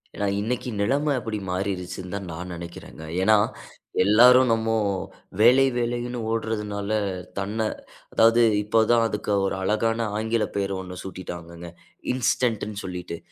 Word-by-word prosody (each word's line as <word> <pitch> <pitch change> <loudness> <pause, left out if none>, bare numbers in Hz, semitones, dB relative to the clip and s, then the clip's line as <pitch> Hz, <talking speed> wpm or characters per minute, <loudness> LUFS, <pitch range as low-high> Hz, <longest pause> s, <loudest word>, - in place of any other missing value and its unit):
ஏனா, 100 - -1 0.2
இன்னைக்கு 125 +3 -2
நிலம 140 +7 +1
அப்படி 110 -2 -4
மாறிருச்சிந்தான் 95 0 -4
நா 80 - -6
நெனைக்கிறேங்க. 85 -2 -9 0.2
ஏனா, 110 +3 +5 0.7
எல்லாரும் 125 +5 +6
நம்மோ 115 0 +1 0.7
வேலை 125 +4 +7
வேலைன்னு 120 0 -2
ஓடுறதுனால, 105 -3 -2 0.5
தன்ன, 105 +3 -1 0.5
அதாவது 115 +1 +5 0.2
இப்ப 110 +2 +3
தான் 115 -1 +4
அதுக்கு 105 -1 -3
ஒரு 95 - -1
அழகான 115 +3 +1
ஆங்கில 110 0 0
பேரு 100 -1 -1
ஒண்ணு 90 -1 -8
சூட்டிட்டாங்க, 85 -2 -8 0.4
இன்ஸ்டன்ட்டுன்னு 115 -4 0
சொல்லிட்டு. 90 -2 -5
105 Hz, 115 wpm, -24 LUFS, 95-115 Hz, 0.7 s, வேலை